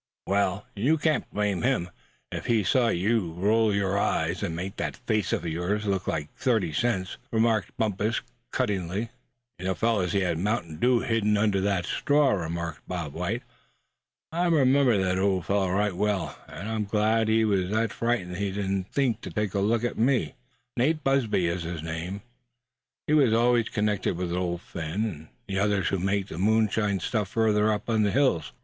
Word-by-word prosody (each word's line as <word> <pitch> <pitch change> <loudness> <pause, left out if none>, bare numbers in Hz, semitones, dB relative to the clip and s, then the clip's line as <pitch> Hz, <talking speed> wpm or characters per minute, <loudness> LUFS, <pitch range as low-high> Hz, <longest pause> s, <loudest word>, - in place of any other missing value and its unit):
"Well, 100 0 0
you 135 +11 +2
can't 155 0 0
blame 105 -3 0
him, 120 -9 0 0.4
if - - -5
he 115 -3 +3
saw 120 +5 +3
you 100 -3 +1
roll 105 +5 +2
your 100 0 +1
eyes, 85 -2 0
and 80 - -2
make 95 +3 -5
that - - -3
face 105 -4 -1
of - - -1
yours 90 +6 -1
look 95 -2 -1
like 75 -2 -3
thirty 110 - 0
cents," 95 -1 -1
remarked 110 -2 +1
Bumpus, 110 +1 0 0.3
cuttingly. 100 +3 -1 0.5
"He 95 - -6 0.6
had 90 -3 0
mountain 85 -5 -1
dew 125 +5 +3
hidden 105 -2 +1
under 100 -2 +2
that 95 -3 0
straw," 145 -1 +2
remarked 85 -3 -3
Bob 85 -6 -4
White; - - -2 0.9
"I 175 +2 +1
remember 135 -6 +4
the 95 -1 +1
old 95 -3 +1
fellow 100 -2 +1
right 100 +1 +1
well, 105 -1 -1
and 95 - -7
I'm 110 -1 -1
glad 110 +2 +2
he 110 0 +3
was 95 -4 +1
that 110 +1 0
frightened 100 -7 -1
he 100 0 -1
didn't 95 -1 -2
think 125 -5 0
to - - -6
take 105 -3 -2
at 100 - +1
look 110 +3 +1
at 120 - -2
me. 125 +2 +2 0.4
Nate 150 +5 +1
Busby 130 -9 +2
is 85 +1 -1
his 85 -1 -5
name. 85 +5 -4 0.8
He 150 - 0
always 120 -4 +4
was - - -12
connected 105 -4 0
with 90 -1 -2
Old 90 -1 -2
Phin, 85 +6 -3
and 80 -7 -6 0.2
the 95 -1 -1
others 100 -2 +1
who 95 - -1
make 100 +1 0
the 80 - -6
moonshine 105 -1 +2
stuff 105 +1 -1
further 110 -1 +2
up 105 - -3
in 110 -2 +2
the 105 - +3
hills. 125 - +1
100 Hz, 175 wpm, -27 LUFS, 90-115 Hz, 0.9 s, remember